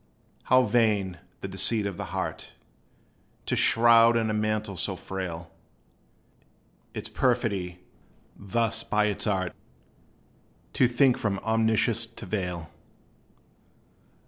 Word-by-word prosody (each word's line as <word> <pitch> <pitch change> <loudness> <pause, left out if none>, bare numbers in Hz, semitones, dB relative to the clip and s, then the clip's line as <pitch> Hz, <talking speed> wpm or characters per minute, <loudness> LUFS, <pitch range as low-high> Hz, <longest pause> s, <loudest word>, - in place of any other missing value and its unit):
How 130 0 +5
vain, 105 -7 +1 0.2
the - - -4
deceit 95 +3 +2
of 100 -3 -4
the - - -4
heart - - -5 0.9
To - - 0
shroud 115 0 +5
in 110 -1 0
a - - -1
mantle 110 -1 -1
so 95 +2 -2
frail! 85 -3 -6 1.4
Its - - -4
perfidy, 90 -5 0 0.6
thus 115 +3 -1
by 105 0 +1
its 105 0 -2
art. 95 -3 -1 1.2
To 125 - +4
think 125 +1 +3
from 100 -3 -1
Omniscience 110 +1 +1
to 115 - -11
veil! 90 -5 -4
105 Hz, 110 wpm, -27 LUFS, 95-115 Hz, 1.4 s, How